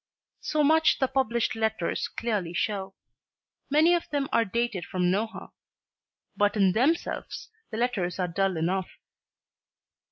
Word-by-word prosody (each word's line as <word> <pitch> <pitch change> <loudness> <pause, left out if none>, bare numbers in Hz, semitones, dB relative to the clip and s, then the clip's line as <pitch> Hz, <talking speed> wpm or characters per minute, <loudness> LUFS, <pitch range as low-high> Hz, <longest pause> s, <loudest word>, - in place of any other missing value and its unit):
So 305 -1 0
much 315 +2 +4
the 265 - +1
published 245 -3 0
letters 220 -5 -1
clearly 205 -7 -3
show. 195 -4 -2 0.7
Many 310 +5 +5
of 345 - -1
them 285 -2 -1
are 230 - +4
dated 225 -3 -2
from 180 0 0
Nohant. 220 +4 -3 0.8
But 205 0 +2
in 195 -2 +4
themselves 275 - -1 0.2
the 220 - -5
letters 215 -8 -1
are 180 -1 0
dull 190 +1 0
enough. 180 +3 -1
220 Hz, 130 wpm, -27 LUFS, 190-255 Hz, 0.8 s, Many